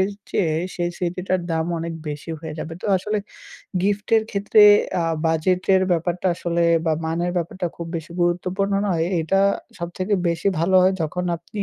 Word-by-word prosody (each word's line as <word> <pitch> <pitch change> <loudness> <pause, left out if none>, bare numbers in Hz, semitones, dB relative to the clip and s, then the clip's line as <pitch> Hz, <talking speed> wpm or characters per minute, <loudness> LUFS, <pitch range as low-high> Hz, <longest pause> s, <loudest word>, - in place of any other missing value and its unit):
এর 190 - +2 0.2
চেয়ে 160 -5 +1 0.2
সেই 175 -1 -1
স্মৃতিটার 180 +1 -1
দাম 160 0 0
অনেক 165 0 -4
বেশি 150 +2 -6
হয়ে 160 -1 -6
যাবে। 160 - -5
তো - - -3
আসলে 210 +3 -2 0.6
gift 205 +1 0
এর 220 - +3
ক্ষেত্রে 205 +1 +4 0.4
আ - - -1 0.2
budget 165 +3 +1
এর 185 - +4
ব্যাপারটা 175 +2 -1
আসলে 170 0 -1 0.2
বা 160 - +3
মানের 170 +2 -1
ব্যাপারটা 175 +2 -3
খুব 170 - -6
বেশি 165 +1 -7
গুরুত্বপূর্ণ 180 +3 0 0.2
নয়। 165 -4 +1 0.2
এটা 175 +5 +1 0.4
সবথেকে 185 +4 -2
বেশি 170 +3 0
ভালো 185 +3 +3
হয় 190 +1 +4
যখন 180 +3 -2
আপনি 200 +5 -6
175 Hz, 170 wpm, -22 LUFS, 165-190 Hz, 0.6 s, ক্ষেত্রে